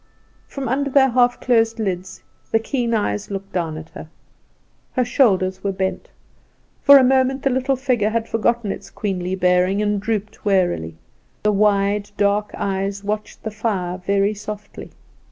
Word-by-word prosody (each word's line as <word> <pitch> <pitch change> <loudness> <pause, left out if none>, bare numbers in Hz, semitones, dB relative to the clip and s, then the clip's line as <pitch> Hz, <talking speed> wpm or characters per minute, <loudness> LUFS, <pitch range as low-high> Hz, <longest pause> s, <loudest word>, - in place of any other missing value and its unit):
From 275 -2 -5
under 280 +4 0
their 270 0 +4
half 245 0 +2
closed 225 -2 +2
lids 190 -4 -4 0.3
the - - +3
keen 235 +1 -2
eyes 105 - -1
looked 195 -1 -6
down 165 -4 -2
at 160 +1 -9
her. 155 - -10 0.8
Her 250 -2 +1
shoulders 190 -8 +2
were 200 - 0
bent; 190 0 -3 0.7
for 280 -1 +9
a 265 - +6
moment 265 +1 +2
the 275 - +2
little 260 +2 +1
figure 250 -5 0
had 230 0 -1
forgotten 225 -1 0
its - - -8
queenly 185 -3 -3
bearing, 180 +1 +2
and 210 -1 0
drooped 215 -1 -3
wearily; 175 - +1 0.5
the 210 - +3
wide, 205 0 +2
dark 205 +1 +1
eyes 195 0 -2
watched 210 +1 -4
the 220 - -4
fire 195 -5 -2
very 200 +2 +1
softly. 210 0 -8
210 Hz, 155 wpm, -21 LUFS, 190-235 Hz, 0.8 s, for